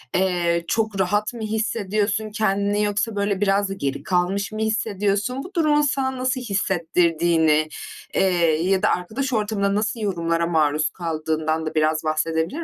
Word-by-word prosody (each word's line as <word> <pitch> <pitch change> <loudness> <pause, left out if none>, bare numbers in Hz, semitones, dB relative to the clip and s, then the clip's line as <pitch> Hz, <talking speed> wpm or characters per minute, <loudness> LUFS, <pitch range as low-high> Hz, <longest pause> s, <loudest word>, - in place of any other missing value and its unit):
eee, 175 -2 +1
çok 220 -1 -1
rahat 205 +4 +1
mı 235 - -8
hissediyorsun 215 -1 -1
kendini 205 -1 +1
yoksa 205 +1 -1
böyle 200 -1 -1
biraz 200 0 +2
da - - -3
geri 140 -8 -3
kalmış 190 +2 0
mı 215 - -5
hissediyorsun? 220 +2 -1
Bu 365 +4 -11
durumun 305 -4 +3
sana 265 -2 0
nasıl 255 +1 -1
hissettirdiğini, 170 -6 +1 0.4
eee, 170 -4 +2
ya 190 -1 +2
da 210 - +3
arkadaş 235 +9 -2
ortamında 205 -2 0
nasıl 220 +3 -1
yorumlara 170 -5 0
maruz 155 -2 +2
kaldığından 160 -1 -2
da 155 - -5
biraz 155 +1 +1
bahsedebilir 160 - -1
195 Hz, 145 wpm, -22 LUFS, 170-215 Hz, 0.4 s, durumun